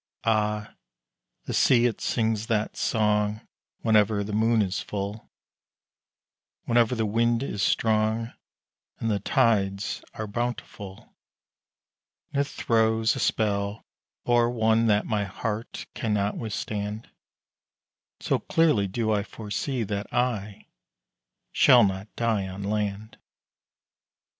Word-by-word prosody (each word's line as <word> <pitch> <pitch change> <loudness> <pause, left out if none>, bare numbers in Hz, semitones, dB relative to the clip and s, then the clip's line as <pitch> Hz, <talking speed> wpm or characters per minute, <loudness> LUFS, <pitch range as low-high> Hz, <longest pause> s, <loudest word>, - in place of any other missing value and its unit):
Ah, 105 -1 0 0.7
the - - -4
sea 120 -2 +4
it 120 -3 -1
sings 110 -1 0
that 110 -2 0
song 105 -1 +1 0.4
Whenever 105 -2 +3
the 105 +1 -6
moon 110 +1 +3
is 95 0 -2
full 100 +1 -5 1.3
Whenever 120 +1 +2
the 110 -1 0
wind 115 +3 +1
is 105 -7 -3
strong, 110 +2 +1 0.6
And 115 - -1
the 100 - 0
tides 100 -4 +1
are 110 - -4
bountiful 105 -3 -5 1.2
And 140 - +1
it 140 - -1
throws 110 -2 +1
a - - -4
spell 100 -1 0 0.4
o'er 120 -1 +3
one 115 -1 +2
That 105 -1 +3
my 105 -2 -1
heart 105 +3 -5
cannot 105 -3 -1
withstand, 105 -1 -4 1.1
So - - 0
clearly 150 -12 +2
do 110 +3 -1
I 105 -1 +2
foresee 115 +5 -4
That 100 0 -4
I 110 -5 -2 0.9
shall 125 -2 +6
not 95 0 -1
die 110 -5 0
on 95 +1 -7
land. 105 +1 -3
110 Hz, 115 wpm, -26 LUFS, 105-115 Hz, 1.3 s, shall